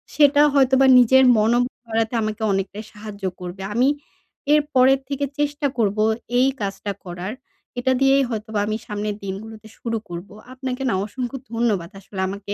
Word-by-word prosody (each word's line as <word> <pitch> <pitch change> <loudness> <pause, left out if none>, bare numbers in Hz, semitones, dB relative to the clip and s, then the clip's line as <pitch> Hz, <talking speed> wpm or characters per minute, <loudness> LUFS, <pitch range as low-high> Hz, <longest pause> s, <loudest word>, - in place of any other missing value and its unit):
সেটা 290 -1 +5
হয়তোবা 265 -1 +4
নিজের 260 +2 +6
মনো 225 +3 +3 0.3
বাড়াতে 225 0 -1
আমাকে 215 +1 -3
অনেকটাই 195 +2 -2
সাহায্য 210 -1 -10 0.2
করবে। 180 +1 -7
আমি 250 +4 +3 0.7
এর 300 - +5
পরের 260 +1 +5
থেকে 280 0 -1
চেষ্টা 290 0 0
করব 210 -3 +1 0.4
এই 255 - +5
কাজটা 200 +1 -3
করার। 180 +3 -5 0.5
এটা 260 +1 +1
দিয়েই 270 0 +5
হয়তোবা 220 -2 -3
আমি 215 0 -1
সামনের 210 0 -3
দিনগুলোতে 215 +3 -7
শুরু 230 -1 -3
করব। 175 +3 -7 0.2
আপনাকে 260 0 -5
না 225 - +1
অসংখ্য 245 +4 -5 0.2
ধন্যবাদ 215 -7 0
আসলে 195 0 -10
আমাকে 200 +1 -5
220 Hz, 155 wpm, -22 LUFS, 200-260 Hz, 0.7 s, নিজের